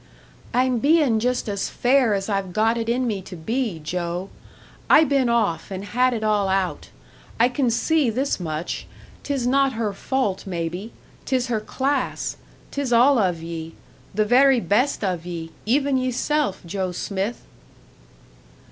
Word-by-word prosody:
"I'm 250 -1 +2
bein' 285 -4 +3
just 250 +2 0
as 200 -2 -2
fair 250 -4 +3
as 195 0 -3
I've 195 -3 -2
got 225 +3 +2
it 230 -1 -2
in 250 +2 +1
me 210 -5 -2
to 185 0 -10
be, 220 +3 -2
Joe. 175 +3 -4 0.6
I 310 - +8
been 275 -4 +2
off 215 -9 0
and 195 0 -5
had 250 +4 +2
it 220 - -3
all 210 -2 +2
out. 190 -1 -1 0.5
I 235 - +6
can 250 0 0
see 275 +4 +2
this 260 +3 -1
much 160 -1 -4 0.3
'tis 275 -4 -2
not 270 +1 +3
her 220 -3 -2
fault, 200 -4 -2
maybe 175 +4 -4 0.3
'tis 255 -2 0
her 225 -2 +1
class; 265 +5 -2 0.4
'tis 280 -3 -2
all 245 +3 +5
of 175 -5 0
ye 165 -1 -6 0.4
the 215 +2 +1
very 260 +3 +5
best 240 +5 +1
of 180 -4 -1
ye, 170 -2 -6 0.2
even 275 +2 +2
yeself, 255 -2 -1
Joe 185 +1 -2
Smith!" 195 +5 -3
225 Hz, 155 wpm, -23 LUFS, 190-255 Hz, 0.6 s, I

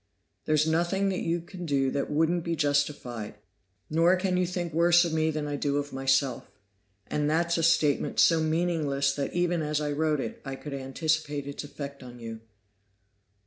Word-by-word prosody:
There's 155 0 +3
nothing 175 +5 +1
you 175 -2 -1
can 180 +1 -9
do 135 -2 +1
that 140 - -2
wouldn't 160 +3 +1
be 170 0 -1
justified, 145 -7 -1 0.5
nor 165 +4 +4
can 185 0 0
you 180 -1 +1
think 175 -2 -3
worse 170 +1 +5
of 165 - -2
me 160 0 +2
than 155 -1 -2
I 145 -1 -3
do 145 0 0
of 145 0 -3
myself. 135 -1 +1 0.6
And 150 0 -1
that's 170 +2 +1
a 165 - 0
statement 155 -3 +2
so 165 -1 +5
meaningless 155 -4 +1
that 140 0 -3
even 175 -1 +1
as 150 -1 -1
I 150 -1 -2
wrote 155 0 +1
it, 115 - -5
I 135 0 -5
could 145 +1 -8
anticipate 145 +2 -1
its 140 +1 -6
effect 140 -1 -8
on 125 -1 -10
you. 115 -1 -7
155 Hz, 180 wpm, -28 LUFS, 140-170 Hz, 0.6 s, worse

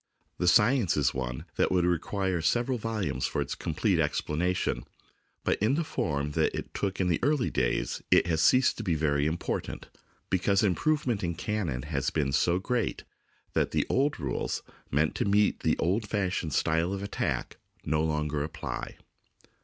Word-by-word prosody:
The 90 - +1
science 115 - +4
is 70 -4 +2
one 65 -1 -4
that - - +2
would 90 -2 +3
require 90 +1 0
several 120 - +1
volumes 110 -3 -1
for - - -3
its - - -2
complete - - 0
explanation, 90 +4 0 0.6
but - - +1
in 110 +6 +3
the 165 - +1
form 75 - -2
that - - +1
it - - -6
took 100 -1 -2
in 95 - +2
the 85 -3 +1
early 140 -1 +1
days - - 0
it - - +5
has 80 -2 +1
ceased 130 +10 +4
to 115 - -4
be 90 -6 +1
very 75 -1 +1
important, 80 +2 -3 0.4
because 100 +3 +2
improvement 120 - +1
in 85 -1 -1
cannon 85 - -2
has 70 -3 -1
been 70 -4 0
so 80 +6 +2
great 115 +4 -1 0.5
that - - +2
the - - 0
old 140 -2 +1
rules 70 -5 -2 0.3
meant 75 +3 +1
to - - -1
meet 105 +1 +3
the - - +1
old 100 +6 0
fashioned 95 -7 -1
style 80 +6 +1
of 100 0 -4
attack 100 - -2 0.3
no 75 +1 +1
longer 75 -2 -1
apply. 60 -5 -5
90 Hz, 170 wpm, -28 LUFS, 75-105 Hz, 0.6 s, it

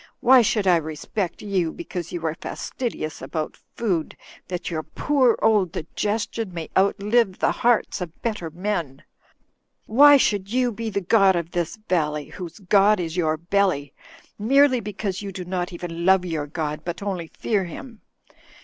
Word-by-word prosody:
Why 255 +1 +7
should 215 -2 +1
I 180 -2 +5
respect 165 +4 -4
you 185 -5 0
because 180 - -6
you 170 -2 -4
are 160 - 0
fastidious 165 - -5
about 155 -2 -4 0.2
food, 185 -9 -1 0.3
that 180 -1 -4
your 160 -2 -2
poor 260 - +1
old 210 -5 +3
digestion 210 +5 -3
may 165 -2 -6
outlive 200 +1 +2
the - - +2
hearts 240 -5 +1
of 170 -2 -7
better 210 -8 -2
men? 170 -5 -3 0.8
Why 285 +5 +7
should 205 -6 0
you 250 0 +2
be 225 +1 -4
the 200 -1 -2
god 195 0 +4
of 170 -1 -3
this 175 +2 -2
valley, 150 -4 0
whose 180 -4 -8
god 200 +1 +4
is 165 -2 -3
)rour 160 -3 +1
belly, 170 -4 0 0.5
merely 265 +4 +4
because 200 -2 -4
you 200 -1 -5
do 185 -1 -6
not 180 0 -3
even 170 -1 -6
love 190 0 +4
your 160 -4 -3
god, 150 -1 -3
but 175 +3 -5
only 185 -5 -3
fear 205 -4 0
him? 225 - -10
190 Hz, 160 wpm, -23 LUFS, 170-215 Hz, 0.8 s, Why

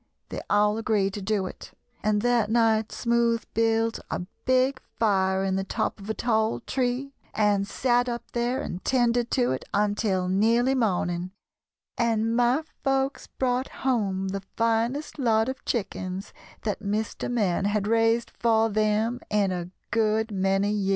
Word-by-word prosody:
They - - -5
all 210 +1 +3
agreed 205 -3 +1
to 205 - -5
do 195 -1 0
it, - - -9 0.3
and 210 0 +1
that 240 -3 +2
night 225 -1 +2
Smoothe 235 -2 +1
built 225 0 +1
a - - -2 0.2
big 260 +1 +2 0.2
fire 190 -3 +2
in 190 0 0
the 195 - -1
top 195 - -2
of 200 +2 -9
a 220 - -1
tall 220 -2 +1
tree 255 +2 -2 0.2
and 205 -2 +2
sat 245 +1 +1
up 235 0 -3
there 240 +2 -1
and 180 - -6
'tended 240 -2 +2
to 250 -2 +2
it 130 - -2
until 205 -2 +1
nearly 230 +7 +3
morning, 180 -7 0 0.7
and 225 -1 +1
my 245 +5 +3 0.2
folks 270 0 0
brought 255 0 -1 0.2
home 195 -7 +1
the 195 +1 -3 0.2
finest 230 +7 0
lot 225 -3 +3
of 260 0 -5
chickens 190 -4 -3 0.3
that 210 -2 -2
Mr. 210 +1 -2
Man 195 -6 +1
had 205 0 0
raised 225 +1 +2
for 225 -1 +3
them 215 +3 +1
in 205 -2 +2
a 175 -1 -4 0.2
good 220 0 +1
many 195 +1 +1
years." 200 -2 0
220 Hz, 155 wpm, -26 LUFS, 200-240 Hz, 0.7 s, all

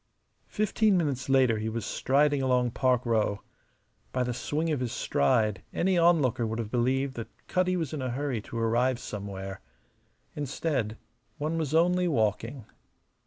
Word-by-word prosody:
Fifteen 215 -1 +2
minutes 140 -6 -1
later 130 -5 +4
he 110 +1 -2
was 115 0 -4
striding 145 +1 +2
along 125 -2 +2
Park 125 0 +1
Row. 110 -3 0 0.7
By 130 - 0
the 125 0 -2
swing 155 +6 -2
of 150 - 0
his 125 -2 -2
stride 110 -4 +1
any 185 +1 +2
onlooker 160 -9 +3
would 110 +1 -3
have 110 -2 -4
believed 130 +2 +1
that 115 - -4 0.2
Cutty 185 0 +1
was 160 -5 -3
in 150 - -3
a 130 - -2
hurry 130 -2 -2
to 115 - -8
arrive 120 +3 +2
somewhere. 100 -3 -6 0.7
Instead, 135 -6 -2 0.4
one 155 +3 -2
was 155 -1 -1
only 180 +2 +3
walking. 115 - -1
130 Hz, 155 wpm, -28 LUFS, 115-150 Hz, 0.7 s, later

